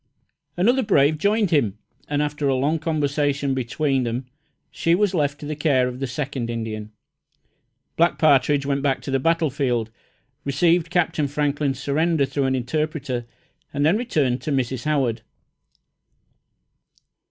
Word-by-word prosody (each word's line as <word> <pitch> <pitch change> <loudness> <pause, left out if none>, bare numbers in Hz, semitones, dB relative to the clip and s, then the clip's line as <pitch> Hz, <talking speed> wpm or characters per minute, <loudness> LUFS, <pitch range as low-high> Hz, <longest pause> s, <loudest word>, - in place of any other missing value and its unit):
Another 240 +9 +3
brave 155 - +3
joined 205 +1 +2
him, 115 - +2 0.3
and 145 0 0
after 150 -1 -2
a 135 - +2
long 145 +5 +1
conversation 145 -3 0
between 130 +2 0
them 120 +2 -3 0.5
she 165 +1 +2
was 200 0 +1
left 145 -4 0
to - - -8
the 150 +1 -3
care 140 -4 +2
of 125 0 -6
the 135 - -2
second 130 -2 -4
Indian. 110 -2 -4 1.1
Black 170 +1 +3
Partridge 145 -2 +3
went 140 0 0
back 135 -1 0
to 140 - -5
the 135 - +2
battlefield, 135 -7 0 0.5
received 165 +4 +2
Captain 160 -4 +1
Franklin's 145 -1 -1
surrender, 150 +2 +1
through 140 0 -1
an 130 0 +1
interpreter, 130 -2 -2 0.4
and 145 +1 0
then 165 +5 +4
returned 150 - 0
to 155 - -3
Mrs. 130 -2 -1
Howard. 130 -7 0
145 Hz, 140 wpm, -23 LUFS, 130-155 Hz, 1.1 s, then